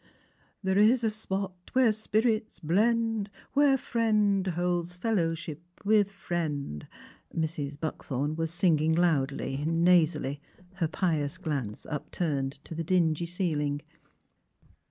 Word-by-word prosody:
'' - - -38
There 190 +1 +2
is 235 +4 +5
a 220 - +2
spot 195 -3 -3 0.2
where 255 -3 +5
spirits 220 +1 0
blend 220 +4 +1 0.2
Where 280 -1 +5
friend 210 -6 +1
holds 175 0 -1
fellowship 165 -6 -1 0.2
with 205 -1 +4
friend. 150 - -3 0.2
' - - -20
' - - -16
Mrs. 150 -3 -3
Buckthorn 145 -2 -2
was 165 0 -1
singing 160 -2 +2
loudly, 140 -5 +1
nasally, 165 -4 +2 0.4
her 170 -4 +1
pious 155 -3 -1
glance 140 - -4
upturned 145 -2 -2
to - - -8
the 165 +1 -3
dingy 170 -1 +2
ceiling. 150 -5 -1
175 Hz, 120 wpm, -29 LUFS, 155-205 Hz, 0.4 s, is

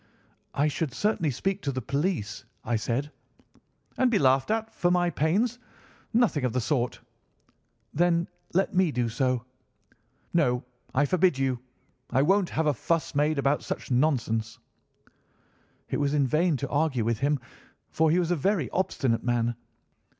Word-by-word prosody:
"'I 145 +2 +3
should 150 -2 -2
certainly 205 -7 +1
speak 195 +9 -2
to 140 - -1
the 130 - -3
police,' 140 - -2 0.2
I 120 - 0
said. 125 +6 -2 0.9
"'And 255 - +4
be 230 - +3
laughed 130 -4 +3
at 225 0 -1
for 175 - +1
my 175 -1 +2
pains. 210 - +1 0.5
Nothing 225 - +2
of 125 - 0
the 130 - +1
sort.' 125 -1 -1 0.9
"'Then 170 +1 +2 0.3
let 190 - +2
me 185 -3 +3
do 120 -3 0
so?' 125 +1 0 0.9
"'No, 125 -7 +2 0.3
I 145 +3 +4
forbid 180 -1 +2
you. 135 -2 0 0.5
I 135 - +3
won't 195 +3 +3
have 160 - -1
a 150 - +3
fuss 165 +6 -1
made 150 +1 +1
about 140 +1 +1
such - - -5
nonsense.' 120 -4 +1 1.3
"It - - -2
was 145 0 +1
in 140 -2 +3
vain 155 +3 +2
to 140 - -4
argue 145 -6 +1
with 115 -1 0
him, 145 +1 +1 0.5
for 160 0 +2
he 165 - +3
was 175 -1 +1
a - - +3
very 170 - 0
obstinate 135 -10 0
man. 120 -1 +1
145 Hz, 155 wpm, -27 LUFS, 130-175 Hz, 1.3 s, And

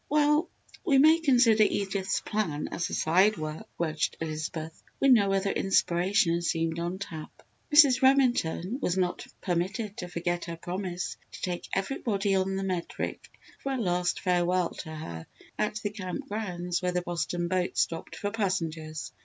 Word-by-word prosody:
"Well, 300 +3 +3 0.3
we 285 -7 +4
may 315 +4 +7
consider 245 -8 +4
Edith's 195 -2 +1
plan 165 -9 -2
as 175 - -2
a - - -6
side 185 +6 +3
work," 155 0 -5
grudged 155 -2 -1
Elizabeth, 155 0 -5 0.2
when 275 -1 +6
no 200 -4 +4
other 195 0 +1
inspiration 175 -2 +2
seemed 165 -1 -1
on 175 +2 -2
tap. 165 -5 -8 0.3
Mrs. 285 -4 +7
Remington 250 -6 +2
was 180 -6 0
not 180 -1 -1
permitted 190 +4 -2
to 180 - -5
forget 175 0 -2
her 170 -1 -6
promise 180 +1 -4 0.2
to - - -9
take 175 -1 -3
everybody 200 -1 0
on 190 0 +1
the 195 - -2
Medric 185 -3 -3 0.3
for 275 - -2
a - - -1
last 180 -5 0
farewell 180 -1 +1
to - - -8
her 85 - -7 0.3
at 210 - 0
the 205 - -1
Camp 185 -4 -5
Grounds 180 -5 -3
where 180 0 0
the 180 0 0
Boston 175 0 -2
boat 180 0 -1
stopped 165 -1 -1
for 205 - -3
passengers. 165 - -2
185 Hz, 160 wpm, -28 LUFS, 170-210 Hz, 0.3 s, may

